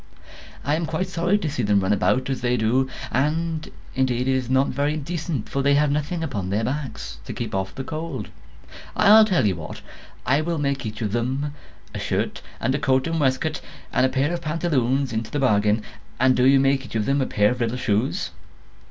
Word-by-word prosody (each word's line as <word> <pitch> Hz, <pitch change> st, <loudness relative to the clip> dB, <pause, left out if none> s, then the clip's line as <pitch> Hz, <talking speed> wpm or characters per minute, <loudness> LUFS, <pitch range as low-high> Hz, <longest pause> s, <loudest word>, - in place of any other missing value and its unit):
I 145 Hz, -, 0 dB
am 165 Hz, 0 st, -2 dB
quite 165 Hz, +4 st, -1 dB
sorry 180 Hz, +3 st, +1 dB
to 190 Hz, -6 st, -3 dB
see 140 Hz, -4 st, -2 dB
them 105 Hz, -2 st, +3 dB
run 95 Hz, +2 st, +2 dB
about 130 Hz, +6 st, +1 dB
as 135 Hz, -2 st, -2 dB
they 125 Hz, 0 st, +1 dB
do; 125 Hz, +4 st, +2 dB, 0.2 s
and 155 Hz, +4 st, 0 dB, 0.2 s
indeed 130 Hz, -1 st, 0 dB
it -, -, +3 dB
is 130 Hz, -2 st, -1 dB
not 130 Hz, +1 st, +3 dB
very 145 Hz, +3 st, 0 dB
decent, 155 Hz, -4 st, -3 dB
for 140 Hz, -, -1 dB
they 140 Hz, +1 st, +4 dB
have 145 Hz, 0 st, +3 dB
nothing 150 Hz, +3 st, -1 dB
upon 100 Hz, -, -3 dB
their 105 Hz, +3 st, 0 dB
backs 135 Hz, -, -4 dB
to -, -, -5 dB
keep -, -, -5 dB
off 95 Hz, 0 st, -2 dB
the 135 Hz, -, -4 dB
cold. 160 Hz, +4 st, -5 dB, 0.7 s
I'll 215 Hz, +2 st, +7 dB
tell 180 Hz, -, +2 dB
you 95 Hz, -4 st, +1 dB
what, 80 Hz, -, -8 dB, 0.4 s
I 140 Hz, +3 st, +3 dB
will 165 Hz, +1 st, -1 dB
make 140 Hz, -4 st, -1 dB
each 110 Hz, +2 st, -5 dB
of 105 Hz, -, -1 dB
them 130 Hz, +6 st, -1 dB, 0.4 s
a -, -, -4 dB
shirt, -, -, -2 dB, 0.2 s
and 130 Hz, -, 0 dB
a 140 Hz, -, 0 dB
coat 130 Hz, -2 st, +2 dB
and 165 Hz, 0 st, -1 dB
waistcoat, 130 Hz, -3 st, 0 dB, 0.3 s
and 125 Hz, -, +3 dB
a 130 Hz, -, +4 dB
pair 140 Hz, +6 st, 0 dB
of 175 Hz, -, -3 dB
pantaloons 140 Hz, -5 st, 0 dB
into 110 Hz, 0 st, -2 dB
the -, -, -3 dB
bargain; 105 Hz, -5 st, +2 dB, 0.4 s
and 130 Hz, 0 st, +4 dB
do 125 Hz, +1 st, +4 dB
you 135 Hz, 0 st, +6 dB
make 135 Hz, 0 st, +2 dB
each 125 Hz, -, -10 dB
of 105 Hz, -2 st, +1 dB
them 140 Hz, +1 st, +2 dB
a -, -, +1 dB
little -, -, -9 dB
pair 105 Hz, 0 st, +5 dB
of 125 Hz, 0 st, -1 dB
shoes. 110 Hz, +3 st, 0 dB
135 Hz, 215 wpm, -23 LUFS, 120-150 Hz, 0.7 s, I'll